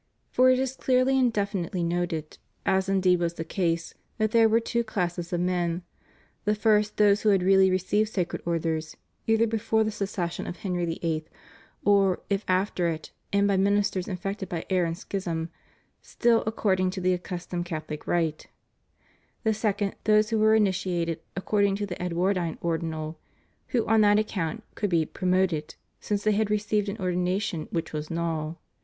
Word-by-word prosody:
For 255 0 +5
it 255 - +5
is 265 0 -1
clearly 260 +1 +2
and 250 -2 +3
definitely 200 -4 -2
noted, 170 -2 -2 0.3
as 190 0 +2
indeed 185 -2 +3
was 170 -1 -1
the 165 - -4
case, 165 -1 -1 0.2
that 215 -1 +1
there 225 -1 +5
were 225 +1 +4
two 235 +1 -1
classes 180 -5 -3
of 175 -1 0
men: 175 -1 0 0.6
the 210 +1 +1
first 210 -1 +2
those 205 0 +4
who 215 - +3
had 195 -3 +3
really 190 0 +5
received 185 +4 +1
Sacred 180 -5 -2
Orders, 160 -2 -2 0.3
either 225 +1 +4
before 225 0 +1
the 215 - -1
secession 195 -4 -3
of 175 - -5
Henry 180 -3 -2
VIIL, 165 -1 -2 0.6
or, 195 -2 +4
if 200 +1 +1
after 185 -1 +1
it 160 -2 -4 0.2
and 200 0 +3
by 200 -1 +2
ministers 200 -1 +1
infected 195 +1 -4
by 165 -2 -4
error 180 -2 +3
and 165 0 -3
schism, 170 -5 -3 0.5
still 235 -1 +2
according 190 -4 +1
to 190 +1 -4
the 185 0 +2
accustomed 175 -1 -4
Catholic 155 -3 -6
rite; 165 -3 0 1.0
the 220 -2 +2
second, 205 -2 -1
those 215 +1 +4
who 220 - +2
were 220 0 +5
initiated 180 -5 0 0.2
according 200 +1 +1
to 205 +1 -2
the 180 -3 -6
Edwardine 180 -1 0
Ordinal, 160 -2 -3 0.5
who 240 -4 0
on 220 0 +4
that 205 0 +5
account 215 -1 -2
could 205 - -2
be 165 -3 +2
"promoted" 180 -3 0 0.2
since 205 -1 -2
they 215 - +3
had 210 0 +1
received 210 -1 0
an 200 - -4
ordination 180 -2 -1
which 165 -1 -3
was 150 0 -4
null. 165 -1 -2
190 Hz, 170 wpm, -27 LUFS, 170-210 Hz, 1.0 s, For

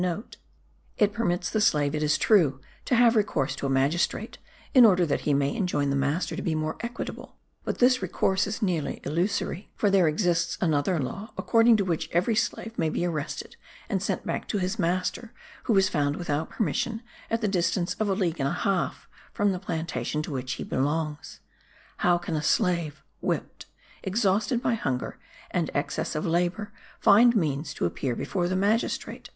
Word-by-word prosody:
It 205 -1 +3
permits 180 -5 -1
the 215 - +1
slave, 145 -7 +2
it 150 - -1
is 150 -1 +2
true, 160 -12 +3 0.3
to 250 - +2
have 235 0 +5
recourse 180 -10 +1
to 140 - -2
a - - -2
magistrate, 135 +6 0 0.3
in 255 -4 +8
order 185 -6 +6
that 145 - -1
he - - +4
may 140 0 +1
enjoin 145 -7 0
the - - +1
master 145 +5 0
to 190 - -4
be 165 -3 -1
more 155 0 -2
equitable; 235 +1 -6 0.3
but - - -3
this 255 +1 +4
recourse 190 +1 +1
is 215 +3 -3
nearly 175 -6 -1
illusory; 180 +3 -2
for 205 - +1
there 190 -4 +4
exists 170 +1 +1
another 160 +1 +1
law 195 - -5
according 230 -1 +4
to 200 - 0
which 170 -4 -2
every 180 +7 +2
slave 225 0 -2
may 160 - +2
be 175 - -1
arrested 155 -5 -4 0.3
and - - 0
sent - - -2
back - - -3
to 210 - -1
his 190 +3 -2
master 185 +6 -1 0.3
who 220 - +3
is 190 0 +5
found 145 -5 0
without 160 -3 -2
permission 225 +5 -2 0.3
at 230 +1 0
the 215 - +1
distance 180 -1 0
of 215 -1 +1
a 195 - +2
league 175 -5 -1
and 135 0 +1
a - - -2
half 190 0 -1 0.2
from 205 -1 +1
the 185 - -3
plantation 160 -5 -3
to - - -6
which 130 -2 -3
he - - -5
belongs. 150 +2 -2 0.6
How 175 -1 +3
can 175 -1 -4
a 150 - 0
slave, 170 -4 0 0.2
whipped, - - -3 0.3
exhausted 210 +3 +1
by - - +2
hunger, 130 - -3 0.3
and - - 0
excess - - -2
of 155 - -2
labour, 175 +5 0 0.3
find 235 +4 +6
means 155 -6 0
to - - -1
appear 120 +8 -2
before 175 +5 -1
the 185 - -1
magistrate? 205 +5 -1
175 Hz, 185 wpm, -26 LUFS, 155-205 Hz, 0.6 s, in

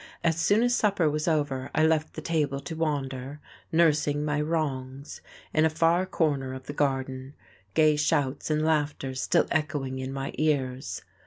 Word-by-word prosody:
As 165 -1 +2
soon 205 +7 +3
as 245 0 +2
supper 200 -8 +2
was 150 +1 -1
over 145 -5 0
I 155 - +4
left 160 -1 +1
the 155 - -6
table 150 -5 0
to 160 +4 -6
wander, 140 -3 -3 0.3
nursing 150 -3 +2
my 150 0 0
wrongs, 140 -3 -3 0.3
in 155 - +3
a 160 - +4
far 165 +3 +2
corner 140 -7 0
of 130 0 -9
the 145 - -6
garden, 135 -1 -2 0.4
gay 155 -1 +4
shouts 145 -2 0
and 155 0 +1
laughter 145 -4 0
still 130 - +2
echoing 140 -4 -1
in 130 0 -4
my 135 0 -4
ears. 135 -4 -1
150 Hz, 165 wpm, -27 LUFS, 135-160 Hz, 0.4 s, I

